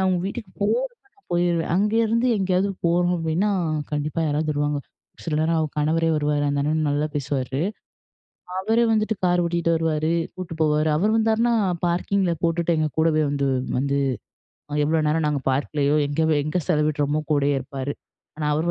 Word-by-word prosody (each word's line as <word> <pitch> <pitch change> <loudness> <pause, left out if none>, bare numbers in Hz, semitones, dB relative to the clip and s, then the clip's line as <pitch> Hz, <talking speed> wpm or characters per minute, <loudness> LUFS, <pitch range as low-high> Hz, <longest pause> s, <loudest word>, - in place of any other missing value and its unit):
அவங்க 185 -1 +2
வீட்டுக்கு 200 0 -5
போறப்ப 485 - 0 0.2
நான் 400 - -32
போயிருவேன் 175 -1 +1
அங்கயிருந்து 225 +4 +2
எங்கேயாவது 190 0 +1 0.2
போறோம் 175 +1 +2
அப்படின்னா 165 +5 0 0.4
கண்டிப்பா 150 +2 -2
யாராவது 155 +1 0
வருவாங்க. 145 0 0 0.5
சில 155 -3 -1
நேரம் 165 +1 +1
அவ 155 - +1
கணவரே 160 +2 +1
வருவாரு, 145 -1 0
அந்த 140 0 0
அண்ணன் 155 +1 0
நல்லா 145 +1 +1
பேசுவாரு. 135 -1 -2 1.0
அவர 220 +5 0
வந்துட்டு 215 0 +1
கார் 175 0 +3
ஓட்டிட்டு 170 0 0
வருவாரு, 160 0 0 0.2
கூட்டு 185 -3 -6
போவாரு. 155 0 +2
அவரு 210 +6 +2
வந்தார்னா 225 +2 +2 0.3
பார்க்கிங்கில 180 +1 +1
போட்டுட்டு. 170 0 +1
எங்க 155 -1 +1
கூடவே 155 -1 +3
வந்து 140 -1 0 0.3
வந்து 140 +1 0 0.9
எவ்வளோ 155 0 +1
நேரம் 155 0 +1
நாங்க 145 -2 -1
பார்க்கலேயோ 145 +1 0
எங்க 145 +3 -2 0.2
எங்க 155 +5 -1
செலவிடுறோமோ 150 -2 +1
கூடயே 145 -1 +2
இருப்பாரு. 135 +1 -5 0.4
ஆனா, 150 -1 -2
அவர் 165 +3 0
160 Hz, 150 wpm, -23 LUFS, 150-180 Hz, 1.0 s, கார்